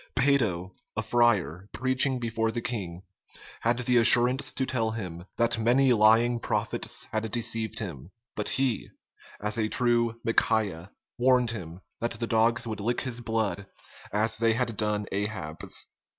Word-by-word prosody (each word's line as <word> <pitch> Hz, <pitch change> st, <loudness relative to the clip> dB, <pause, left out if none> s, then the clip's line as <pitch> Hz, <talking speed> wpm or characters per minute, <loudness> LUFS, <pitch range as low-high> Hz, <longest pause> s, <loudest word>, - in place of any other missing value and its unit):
Peyto, 115 Hz, -10 st, +1 dB, 0.3 s
a 110 Hz, -, 0 dB
friar, 100 Hz, -7 st, +1 dB
preaching 130 Hz, +1 st, +3 dB
before 115 Hz, -2 st, -1 dB
the 120 Hz, -, -3 dB
king, 95 Hz, -7 st, -5 dB, 0.6 s
had 115 Hz, +1 st, +1 dB
the 125 Hz, 0 st, +1 dB
assurance 125 Hz, +4 st, +6 dB
to 130 Hz, -, -1 dB
tell 115 Hz, -4 st, -1 dB
him, 90 Hz, -6 st, -6 dB
"that 115 Hz, 0 st, +2 dB
many 125 Hz, +3 st, +3 dB
lying 115 Hz, +2 st, +4 dB
prophets -, -, -2 dB
had 110 Hz, 0 st, -2 dB
deceived 115 Hz, -1 st, -2 dB
him; 85 Hz, -, -5 dB, 0.3 s
but 105 Hz, -, -2 dB
he, 130 Hz, -4 st, -1 dB, 0.5 s
as 105 Hz, +2 st, -2 dB
a 110 Hz, -1 st, 0 dB
true 120 Hz, -2 st, +1 dB
Micajah, 105 Hz, -6 st, 0 dB, 0.3 s
warned 125 Hz, -2 st, +3 dB
him, 90 Hz, -5 st, -8 dB, 0.2 s
that 115 Hz, +1 st, -2 dB
the 120 Hz, -, -1 dB
dogs 115 Hz, +2 st, +2 dB
would 110 Hz, -2 st, -5 dB
lick 120 Hz, +4 st, -1 dB
his 125 Hz, -2 st, -3 dB
blood, 110 Hz, -5 st, -2 dB, 0.4 s
as 110 Hz, +1 st, 0 dB
they 115 Hz, -1 st, +2 dB
had 120 Hz, -2 st, -1 dB
done 105 Hz, -1 st, -1 dB
Ahab's." 95 Hz, -6 st, -3 dB
115 Hz, 150 wpm, -27 LUFS, 105-120 Hz, 0.6 s, assurance